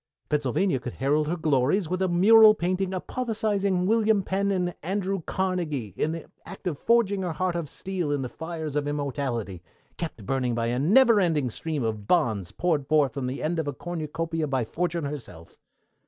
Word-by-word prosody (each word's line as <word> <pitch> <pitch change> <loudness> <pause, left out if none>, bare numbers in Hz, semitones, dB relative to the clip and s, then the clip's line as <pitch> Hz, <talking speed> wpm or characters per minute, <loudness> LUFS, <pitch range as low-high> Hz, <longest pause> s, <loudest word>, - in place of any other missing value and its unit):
Pennsylvania 150 +2 +1
could 125 0 -6
herald 150 +3 +1
her 175 +3 -1
glories 155 +4 +1
with 185 +3 -2
a 190 - +2
mural 215 +5 +7
painting 185 +1 -1
apotheosizing 200 -2 -1
William 215 -1 +3
Penn 195 +2 0
and 180 -2 0
Andrew 195 +2 -2
Carnegie 165 - -2
in 155 - 0
the 165 -1 -6 0.2
act - - -11
of 165 -6 -2
forging 220 -4 +2
her 180 -3 -2
heart 180 +1 -1
of 165 -4 -3
steel 180 -4 -3
in 145 -2 0
the - - -3
fires 160 +1 -6
of 145 -1 0
immortality, 135 - -3 0.4
kept 150 - -5
burning 125 0 0
by 115 0 0
a 120 +2 0
never 220 - +5
ending 155 -9 +1
stream 155 +2 -3
of 110 -2 -3
bonds 110 - +1
poured 155 -6 0
forth 150 -3 +3
from 135 -3 -3
the 130 +2 -4
end 165 +2 0
of 160 - -2
a 145 - -2
cornucopia 165 -1 -3
by 130 -4 0
Fortune 170 +4 -2
herself. 120 - -8
160 Hz, 185 wpm, -26 LUFS, 140-185 Hz, 0.4 s, mural